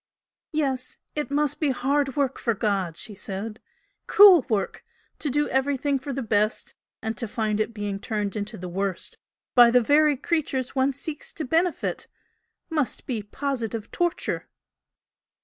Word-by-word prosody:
"Yes! 270 -5 -1 0.2
it 300 -1 -2
must 290 0 0
be 300 - +2
hard 275 +1 +1
work 275 -2 0
for 230 -2 0
God!" 195 -6 -1
she 215 - -6
said 205 +2 -6 0.5
"Cruel 395 - +8
work! 205 -4 -1 0.4
To 295 - -1
do 295 +2 +1
everything 275 +1 +1
for 280 +2 -5
the 270 0 -3
best 215 0 0 0.3
and 220 0 -2
to 235 - -2
find 215 -1 -1
it 215 - 0
being 205 -3 -4
turned 210 -1 -2
into 215 +1 -4
the 180 - -6
worst 190 +1 -3 0.3
by 240 -2 +8
the 250 +1 +5
very 290 +4 +4
creatures 275 -4 -1
one 265 +1 +3
seeks 295 +2 -7
to 315 - -4
benefit, 330 +5 0 0.6
must 300 -5 -1
be 235 -5 -2
positive 230 -1 -4
torture! 345 0 -1
255 Hz, 150 wpm, -25 LUFS, 215-290 Hz, 0.6 s, Cruel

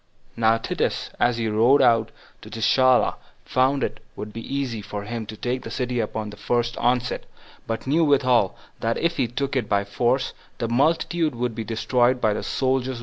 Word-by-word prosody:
2. - - -10
Now 110 0 +5
Titus, 115 - -2
as 120 -1 +2
he 115 -1 -1
rode 115 +6 +4
out 115 -2 +4 0.3
to - - -11
Gischala, 125 +3 +3 0.3
found 130 +1 +2
it - - -3 0.2
would 105 0 -7
be 115 - -6
easy 130 -3 -3
for 105 0 -6
him 110 0 -5
to 110 - -8
take 125 +3 -2
the - - -8
city 125 -1 -2
upon 110 -1 -3
the 105 - -12
first 120 +3 0
onset; 125 0 0 0.4
but 115 0 -3
knew 155 +5 +3
withal, 130 - +3 0.2
that 115 0 0
if 170 0 0
he 130 -4 +1
took 140 +4 -3
it 120 -5 -1
by 100 -1 +2
force, 120 +6 0 0.2
the 115 - -2
multitude 155 +4 +1
would 120 0 -2
be 115 0 -4
destroyed 120 +3 +1
by 110 -3 +2
the - - -3
soldiers 130 -1 0
without - - -3
mercy. - - -7
120 Hz, 205 wpm, -24 LUFS, 110-130 Hz, 0.4 s, Now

